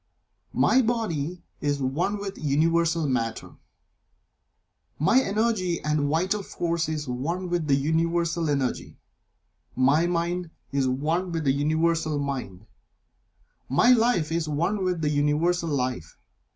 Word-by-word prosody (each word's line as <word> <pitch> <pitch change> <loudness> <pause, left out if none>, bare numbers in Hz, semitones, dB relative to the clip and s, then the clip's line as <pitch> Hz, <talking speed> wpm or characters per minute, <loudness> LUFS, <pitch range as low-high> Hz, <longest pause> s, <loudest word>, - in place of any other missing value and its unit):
My 260 - +4
body 180 - -2 0.2
is 145 -1 -1
one 150 +10 -1
with 200 -1 -5
Universal 165 +2 +1
Matter; 115 -4 -2 1.5
My 225 - +4
energy 200 -6 0
and 150 -1 0
vital 185 +7 0
force 170 -3 -2
is 150 -2 -3
one 165 +9 -3
with 175 -3 -1
the 140 - +4
Universal 165 +2 0
Energy; 140 -3 -2 0.8
My 140 +6 +3
Mind 175 0 -1 0.2
is 135 -1 +1
one 160 +8 -1
with 165 -1 -2
the 135 -2 +2
Universal 155 +2 +1
Mind; 130 -9 -4 1.0
My 225 - +4
Life 225 -10 +3
is 165 -1 -1
one 170 +7 0
with 180 -3 -1
the 150 - +1
Universal 150 +4 +1
Life. 125 - -3
160 Hz, 125 wpm, -25 LUFS, 145-175 Hz, 1.5 s, My